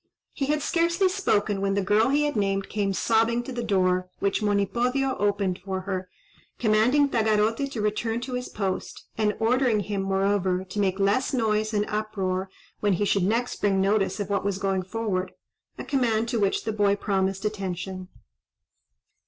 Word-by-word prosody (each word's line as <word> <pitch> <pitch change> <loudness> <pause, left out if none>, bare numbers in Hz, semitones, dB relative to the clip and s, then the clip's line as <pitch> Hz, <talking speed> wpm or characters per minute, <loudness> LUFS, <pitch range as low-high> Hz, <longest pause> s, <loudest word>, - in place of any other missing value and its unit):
He 275 - -2
had 300 0 0
scarcely 340 +3 +2
spoken 210 - 0
when 195 0 0
the 200 - +1
girl 210 +5 +3
he 290 +2 +2
had 295 - -1
named 195 -1 0
came 200 -1 -1
sobbing 230 +5 +2
to 265 - -7
the 245 -1 -3
door, 185 -4 +1
which 200 +2 0
Monipodio 240 +6 +1
opened 200 -3 0
for 190 0 -4
her, 185 -1 -4 0.5
commanding 240 +6 +3
Tagarote 220 +2 +1
to 240 -6 -4
return 225 +2 -1
to 255 +1 -5
his 250 0 -3
post; 195 -3 -4
and 210 -1 +1
ordering 235 -1 +2
him, 200 -1 -3
moreover, 195 -1 +1
to 190 +2 -6
make 190 -1 +1
less 205 +8 +1
noise 215 -2 +1
and 210 -1 +1
uproar 195 -3 -2 0.3
when 205 -2 +2
he 205 +3 0
should 200 0 +2
next 230 +5 -1
bring 195 -2 +2
notice 195 +1 +1
of 205 - -2
what 200 - 0
was 200 -1 -1
going 195 -1 0
forward,—a 190 -2 -5
command 230 -5 +1
to 235 -2 0
which 200 -2 +1
the 220 - -2
boy 205 -1 +2
promised 195 -1 -1
attention. 190 -2 -4
210 Hz, 170 wpm, -26 LUFS, 195-230 Hz, 0.5 s, girl